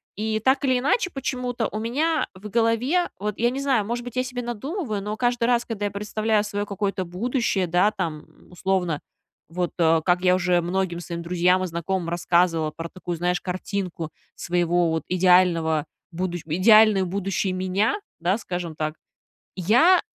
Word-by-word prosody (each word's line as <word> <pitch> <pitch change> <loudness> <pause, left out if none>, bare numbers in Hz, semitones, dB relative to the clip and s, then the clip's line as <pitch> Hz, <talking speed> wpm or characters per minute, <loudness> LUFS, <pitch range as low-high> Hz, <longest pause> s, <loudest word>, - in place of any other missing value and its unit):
и 215 +1 -1
так 265 +5 +2
или 255 -2 +3
иначе 295 - +1
почему-то 250 -4 -2
у 215 - -3
меня 295 +8 0
в 195 +3 -10
голове- 235 - +1
вот 210 0 -3
я 240 +1 +2
не 270 +2 -3
знаю, 260 -7 +1
может 240 +3 -3
быть, 245 -1 -8
я 255 - +1
себе 250 -1 -5
надумываю- 240 - -4
но 210 +1 -3
каждый 245 -1 +1
раз, 240 0 +2
когда 210 -3 -3
я 205 - -2
представляю 210 +1 0
свое 205 0 -3
какое-то 200 -1 -2
будущее, 195 +1 -1
да, 180 +5 +3
там, 170 -7 -4 0.3
условно, 180 -3 -1 0.5
вот, 175 +1 -2
э, 165 -1 +4
как 180 0 +3
я 180 0 +4
уже 180 -1 +2
многим 175 0 -1
своим 170 -1 -5
друзьям 180 +2 +2
и - - -1
знакомым 170 +1 -2
рассказывала 170 -2 +1
про 165 +2 -6
такую, 175 -1 -5
знаешь, 180 +1 0
картинку 180 -3 -4 0.3
своего 175 -1 +1
вот 160 0 -1
идеального 180 -4 +3 0.3
будущ 175 0 -3
идеальную 200 +4 +5
будущей 195 +1 -1
меня, 185 +4 0 0.2
да, 180 +4 +1
скажем 175 -6 -5
так. 155 0 -3 0.6
Я 245 - +5
190 Hz, 165 wpm, -24 LUFS, 175-230 Hz, 0.6 s, идеальную